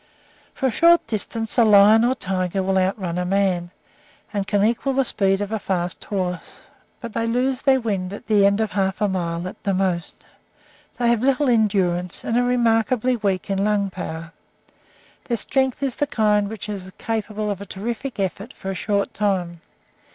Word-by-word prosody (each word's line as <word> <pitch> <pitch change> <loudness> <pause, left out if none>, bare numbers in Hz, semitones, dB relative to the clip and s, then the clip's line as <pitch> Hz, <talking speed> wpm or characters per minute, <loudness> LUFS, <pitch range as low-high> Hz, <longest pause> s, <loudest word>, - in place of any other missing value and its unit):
For - - -2
a 260 - +3
short 340 +6 +5
distance 225 +2 -2
a - - +7
lion 215 +1 +6
or 245 +2 +3
a - - -9
tiger 190 -1 -1
will 190 0 +1
outrun 185 -2 -1
a - - 0
man, 185 -2 0 0.6
and 200 -2 -2
can 205 -1 +2
equal 240 +4 0
the 270 0 +2
speed 195 -3 +1
of 205 +1 -3
a 220 - -1
fast 180 -3 -2
horse, 180 -4 -4 0.4
but 235 -2 -8
they 230 +1 -1
lose 250 +2 0
their 265 -1 +4
wind 195 -6 -2
at 205 - -8
the 210 -2 +3
end 200 +1 +1
of 220 -1 -1
half 195 -1 -1
a 210 - +2
mile 175 -2 -2
at 185 - -9
the 195 -1 0
most. 185 -3 -2 0.7
They 240 -1 +2
have 235 -2 +1
little 275 +2 +2
endurance, 190 -6 +1
and 230 - -1
are 245 - +3
remarkably 245 0 +2
weak 195 -5 -1
in 195 0 0
lung 205 -2 +1
power. 165 -2 -6 0.9
Their 235 - -1
strength 265 +2 0
is 265 -3 -2
the 290 - 0
kind 210 -5 +2
which 220 -1 -6
is 190 -3 -6
capable 215 -1 -3
of 200 -1 -5
a 200 - -8
terrific 235 +5 -5
effort 195 +4 -3
for 190 - -6
a - - -3
short 200 +3 -1
time. 180 -5 -1
205 Hz, 190 wpm, -22 LUFS, 190-230 Hz, 0.9 s, a